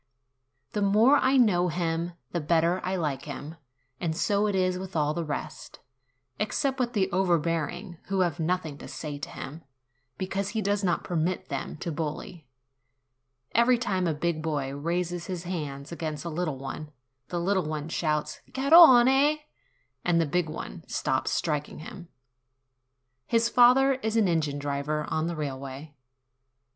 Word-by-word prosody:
The 210 - -2
more 215 +8 +5
I 270 0 +3
know 185 -8 +4
him, 170 0 -1 0.2
the 175 - -1
better 170 +3 +2
I 185 +1 -1
like 150 -7 -2
him; 150 +2 -7 0.4
and 160 -2 -2
so 205 +3 +2
it 205 - 0
is 185 -1 +1
with 190 -1 -8
all 150 -1 +1
the 170 - -2
rest, 150 -2 -6 0.6
except 265 +6 0
with 245 -1 0
the 195 -4 +2
overbearing, 170 -1 0
who 195 -1 0
have 175 -4 0
nothing 160 -3 -1
to - - -9
say 145 -2 -6
to 140 - -6
him, 150 +5 -8 0.6
because 195 +1 -2
he - - +1
does 200 +1 0
not 175 -2 +1
permit 175 +1 -1
them 140 +1 -4
to 170 - -3
bully. 160 - -5 1.0
Every 240 +2 +4
time 190 -7 0
a 165 - +1
big 155 +1 -1
boy 145 -4 -2
raises 170 +3 -2
his 180 -2 -4
hand 150 -5 -5
against 155 -2 -4
a - - -2
little 160 -3 -2
one, 135 +3 -6 0.4
the 175 - -3
little 190 0 +1
one 155 -1 -3
shouts, 155 -2 -1
"Garrone!" 275 -1 +7 0.7
and 175 -1 +2
the 165 - +3
big 165 +2 0
one - - -7
stops - - -1
striking 150 -1 -1
him. 170 +3 -9 1.2
His 230 0 +2
father 255 +3 +6
is 225 -4 -2
an 215 -3 +4
engine 155 -4 0
driver 145 +1 -2
on 160 +1 0
the 170 - -3
railway. 140 0 -6
170 Hz, 155 wpm, -27 LUFS, 155-195 Hz, 1.2 s, Garrone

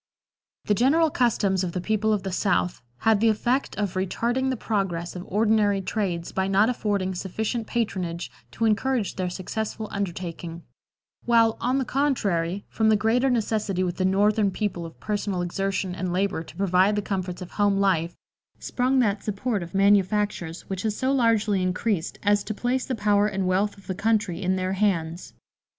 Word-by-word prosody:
The 210 - +2
general 295 +9 +3
customs 200 -7 +1
of 175 -2 -3
the 180 - -2
people 215 +3 0
of 205 -3 0
the 190 - -3
South 180 -1 0 0.2
had 220 -2 +4
the 225 - +5
effect 240 +4 0
of 205 -3 -1
retarding 235 +8 0
the 260 - -1
progress 190 -6 -2
of 180 - -5
ordinary 210 -1 +2
trades 185 -4 -2
by 190 0 0
not 200 +4 +3
affording 200 -5 -1
sufficient 220 +5 -3
patronage 180 -7 -2 0.2
to 230 - 0
encourage 225 0 +1
their 185 -1 -2
successful 215 +4 -4
undertaking; 175 -3 -5 0.6
while, 230 -2 +4
on 250 +2 +1
the 265 - 0
contrary, 200 -11 0
from 220 -1 +1
the 215 - +5
greater 230 +6 +2
necessity 215 -5 0
with 175 -1 -2
the 185 - 0
Northern 205 +2 +3
people 185 -4 -3
of 165 - -15
personal 205 -3 -2
exertion 195 +1 -2
and 185 -1 -3
labor 185 -2 0
to 165 - -12
provide 190 +2 +3
the 205 - -1
comforts 185 -2 -3
of 180 - -11
home 205 -1 +2
life, 175 -4 +1 0.4
sprung 255 +2 0
that 205 -3 0
support 210 +1 -2
of 170 +2 -8
manufactures 195 -3 +1
which 190 -1 -3
has 215 0 -1
so 260 0 +1
largely 225 -6 +2
increased 185 0 -1
as 205 -1 +3
to 215 - -4
place 250 +3 -1
the 260 - -1
power 205 -1 +3
and 195 -2 -2
wealth 195 +3 +1
of 195 - -17
the 190 - -3
country 205 -2 0
in 185 0 +1
their 185 0 -1
hands. 180 -4 -1
200 Hz, 175 wpm, -25 LUFS, 185-220 Hz, 0.6 s, the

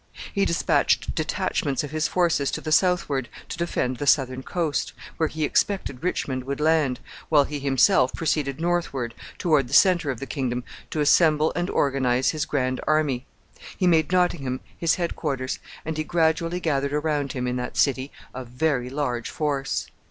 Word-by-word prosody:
He 200 -2 +2
dispatched 170 - +1
detachments 140 +1 -1
of 145 - -6
his 155 0 0
forces 170 -6 +1
to - - -3
the 155 - -5
southward 155 -8 +2 0.2
to - - -5
defend 130 -7 -1
the 145 - -4
southern 130 -2 +3
coast, 160 +1 -2 0.2
where 160 -2 +1
he 155 0 -3
expected 150 -4 0
Richmond 130 -7 -1
would 140 +1 -3
land, 150 -4 +2 0.3
while 150 -3 +5
he 145 +1 -5
himself 135 -1 +3
proceeded 145 -4 -1
northward, 165 -9 -1 0.2
toward 150 -7 +2
the 135 - -1
centre 175 -5 +5
of 130 -4 -3
the 135 - -5
kingdom, 125 -4 -2 0.3
to 155 - -2
assemble 155 +1 +4
and 175 +2 -1
organize 130 -2 +1
his 155 -2 -2
grand 130 -2 -1
army. 150 -5 +1 0.5
He 185 - +1
made 160 -3 +3
Nottingham 140 -8 +1
his 165 -1 +1
head 170 -2 -2
quarters, 135 -4 -3 0.3
and 160 0 -3
he 155 - -1
gradually 165 +1 +1
gathered 140 -4 0
around 150 -2 -1
him, 125 -2 -3
in 125 0 -1
that 125 0 -5
city, 135 0 +1 0.2
a 130 - -5
very 125 0 -1
large 125 -4 -2
force. 140 -3 -2
145 Hz, 170 wpm, -24 LUFS, 130-160 Hz, 0.5 s, while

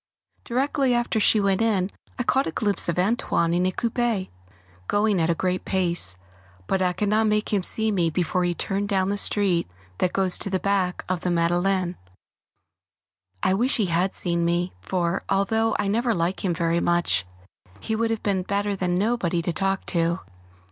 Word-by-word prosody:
Directly 265 +1 +1
after 240 -2 0
she 215 +1 +4
went 195 0 +1
in 200 -4 +1 0.3
I 245 - -1
caught 270 +3 +1
a - - -2
glimpse 205 +1 0
of 170 - -1
"Antoine" 180 -4 +1
in 180 +1 +2
a - - 0
coupé, 230 -2 -1 0.6
going 205 -3 +2
at 160 - +1
a 170 - +2
great 185 +1 -1
pace, 175 - +1 0.5
but 190 - 0
I 180 -1 +2
could 205 +4 -1
not 215 +1 +3
make 210 +1 0
him 200 - +2
see 220 +4 +1
me 175 -5 +1
before 180 +2 0
he 175 - +1
had 175 - -3
turned 200 +1 -2
down 190 -2 +1
the 205 - -1
street 190 - +1 0.3
that 180 - +1
goes 190 -2 0
to - - -1
the 190 -1 0
back 190 -2 0
of 185 -1 -1
the 180 - -2
Madeleine. 175 +2 +1 1.5
I 185 - +3
wish 240 +7 +2
he 215 - +2
had 180 +2 0
seen 170 -1 0
me, 175 +1 0
for, 180 0 -1
although 220 +3 +1
I 205 - -1
never 230 +3 +1
like 170 +2 -1
him 180 -3 0
very 170 0 +1
much, 170 - +1 0.5
he 220 - -2
would 230 +1 0
have 225 -1 -2
been 195 -2 +1
better 200 +2 -1
than 180 -2 -1
nobody 185 -4 0
to 170 - -1
talk 195 +3 -1
to. 170 +1 +1
190 Hz, 190 wpm, -24 LUFS, 175-210 Hz, 1.5 s, she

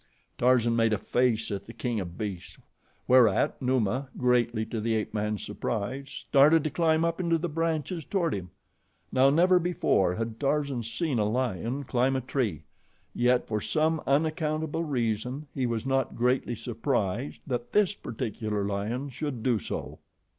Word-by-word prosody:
Tarzan 120 -2 +3
made 115 -1 +3
a - - +2
face 115 0 0
at 100 0 -4
the 115 - -9
king 120 -3 -2
of 85 -3 -6
beasts, 100 -5 -5 0.5
whereat 125 -4 +4
Numa, 130 +1 0
greatly 120 -3 +2
to 110 -1 -4
the 115 +1 0
ape 110 - -2
man's 105 -1 -2
surprise, 120 +6 -3
started 150 +3 +4
to 155 - -1
climb 160 +1 +2
up 165 +1 -1
into 170 -2 +2
the 170 +2 -2
branches 165 +1 -2
toward 175 -3 0
him. 90 -2 -5 0.6
Now, 130 +1 +5
never 180 +5 +5
before 165 - +1
had 115 +1 -4
Tarzan 140 -3 0
seen 125 +3 -1
a 105 - +2
lion 125 +2 -1
climb 130 +1 +1
a 130 - 0
tree, 115 - -2 0.5
yet, 125 +1 +2
for 105 -1 -1
some 155 +4 +1
unaccountable 155 +2 0
reason, 125 0 -2
he 130 -2 -1
was 115 0 -2
not 135 -2 0
greatly 125 0 +1
surprised 115 0 -2
that 120 -3 -3
this 205 -2 +3
particular 110 - -3
lion 105 +7 -2
should 130 -3 -4
do 120 -4 +2
so. - - -6
125 Hz, 160 wpm, -28 LUFS, 110-145 Hz, 0.6 s, Now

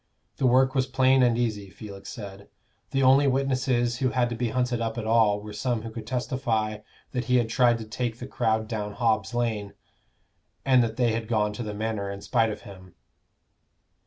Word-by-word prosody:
The 130 - +2
work 130 +1 +4
was 130 -1 +1
plain 130 0 +3
and 120 -2 +3
easy, 105 -5 -2
Felix 100 +1 -10
said. 100 -2 -9 0.4
The 135 0 0
only 135 +2 +6
witnesses 130 -3 +1
who 130 - +2
had 125 -1 +1
to 120 - -3
be 120 0 -1
hunted 125 0 0
up 115 0 -2
at 115 - -3
all 110 -2 +3
were 105 0 -9
some 120 0 -2
who 115 - -6
could 110 -1 -8
testify 120 -4 -1 0.3
that 125 -1 -2
he 125 - +2
had 120 -2 +2
tried 120 -1 +3
to 110 - -7
take 115 +1 -3
the 125 - -7
crowd 110 -4 0
down 105 -2 -4
Hobb's 110 -3 0
Lane, 110 -4 -1 0.9
and 130 -2 +5
that 115 0 -3
they 120 -2 +2
had 110 0 -3
gone 105 -2 +1
to 105 - -6
the 105 -2 -5
Manor 105 -2 -2
in 100 0 -6
spite 115 +1 +1
of 105 - -6
him. 95 -3 -13
115 Hz, 200 wpm, -26 LUFS, 110-125 Hz, 0.9 s, only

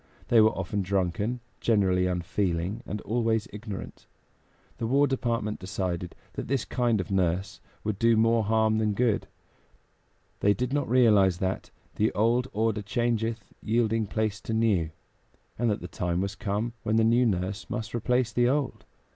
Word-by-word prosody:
They 115 -2 +6
were 110 0 +3
often 95 +2 -2
drunken, 100 +5 -1 0.2
generally 95 -5 +2
unfeeling, 90 +2 -1
and 105 - -4
always 115 -1 0
ignorant. 105 -2 -7 0.7
The 115 - -1
War 140 +4 +4
Department 115 -5 -1
decided 90 -2 -3 0.2
that - - -5
this 135 -1 0
kind 120 -4 +1
of 95 - -4
nurse 95 +1 0 0.2
would 105 -2 -2
do 115 -1 +4
more 115 0 +3
harm 110 0 +2
than 105 -2 +1
good; 120 -1 +1 1.1
they 100 0 +3
did 125 +2 -2
not 145 -4 0
realize 105 -7 +5
that 95 +1 -2 0.3
"The 110 - +2
old 120 +4 +2
order 110 0 0
changeth, 115 0 -1 0.2
yielding 115 -1 +1
place 110 0 -1
to 110 - -3
new," 105 -8 +2 0.7
and 120 -1 +2
that 105 - -1
the 90 - -6
time 85 +1 -2
was 100 +1 -1
come 105 +3 -2
when 110 0 0
the 115 - +4
new 120 +2 +4
nurse 95 0 -2
must 115 -3 -4
replace 120 0 +1
the 120 0 +3
old. 140 0 -1
110 Hz, 160 wpm, -27 LUFS, 95-115 Hz, 1.1 s, They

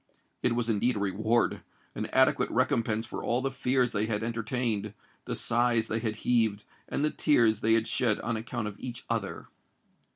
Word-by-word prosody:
It 120 -1 +1
was 120 -1 -1
indeed 115 +2 +1
a - - -2
reward—an 110 +4 -1
adequate - - +3
recompense 115 0 +1
for - - -6
all 120 - +1
the 135 - 0
fears 125 -1 +1
they 105 -1 0
had 110 -1 -1
entertained, 115 -2 -1 0.3
the - - -3
sighs 120 -1 +2
they 115 - 0
had 110 -1 -2
heaved, 110 -4 +2 0.3
and 145 - 0
the 155 - +1
tears 115 -8 +3
they 115 0 +3
had 115 0 +1
shed 115 -1 +1
on 120 +1 -2
account 115 0 -4
of 105 - -8
each 120 -2 -7
other! 110 -4 -3
115 Hz, 175 wpm, -29 LUFS, 110-120 Hz, 0.3 s, adequate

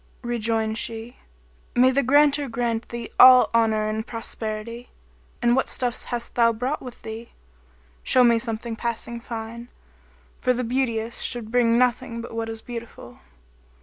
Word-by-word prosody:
Rejoined 225 -2 -1
she, 225 +1 -5 0.6
"May 255 +1 +5
the 275 +2 +2
Granter 285 +1 +3
grant 230 -1 -2
thee 235 -1 -6
all 255 0 +9
honour 220 -2 +2
and 215 +1 -2
prosperity! 230 0 -6 0.5
And 240 0 +4
what 265 - +1
stuffs 245 -1 -2
hast 240 -1 -5
thou 235 -1 +4
brought 250 +6 -3
with 250 -2 -10
thee? 225 +1 -8 0.7
Show 255 - +4
me 235 -1 +4
something 225 0 -3
passing 235 +1 -4
fine; 230 +1 -7 0.7
for 250 - +2
the 250 +1 -2
beauteous 235 -2 -1
should 235 -3 -3
bring 235 -1 +3
nothing 250 -1 +1
but 230 - -8
what 225 0 -3
is 225 0 -6
beautiful." 230 - -9
235 Hz, 150 wpm, -24 LUFS, 225-245 Hz, 0.7 s, all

